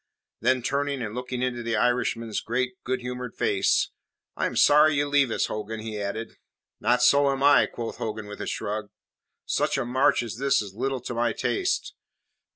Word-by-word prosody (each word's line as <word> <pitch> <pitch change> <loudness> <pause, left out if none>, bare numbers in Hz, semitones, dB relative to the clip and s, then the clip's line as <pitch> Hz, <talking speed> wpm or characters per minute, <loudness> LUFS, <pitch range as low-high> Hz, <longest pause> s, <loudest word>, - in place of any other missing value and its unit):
Then, 130 -1 +2
turning 140 -1 -1
and 105 -2 -5
looking 125 +1 -4
into 125 -1 -2
the 115 -1 -1
Irishman's 115 -1 0
great, 125 +2 -1
good 130 0 -2
humoured 125 0 -6
face - - +1 0.4
"I - - 0
am - - -6
sorry 150 +1 +6
you 145 +1 +1
leave 140 -2 +3
us, - - 0
Hogan," 110 +1 -5
he 110 -1 -5
added. 110 +3 -5 0.4
"Not 120 +3 +2
so 140 +1 +5
am 135 0 -1
I," 145 -1 +6
quoth 115 -1 -6
Hogan 110 -1 -4
with 105 0 -8
a - - -4
shrug. 105 0 -3 0.6
"Such - - 0
a - - -1
march 130 +1 +2
as 115 -1 -6
this 135 +2 +2
is 100 -2 -5
little 130 +3 -2
to 125 - -5
my 120 -1 +1
taste. 375 - -1
125 Hz, 185 wpm, -26 LUFS, 110-135 Hz, 0.6 s, sorry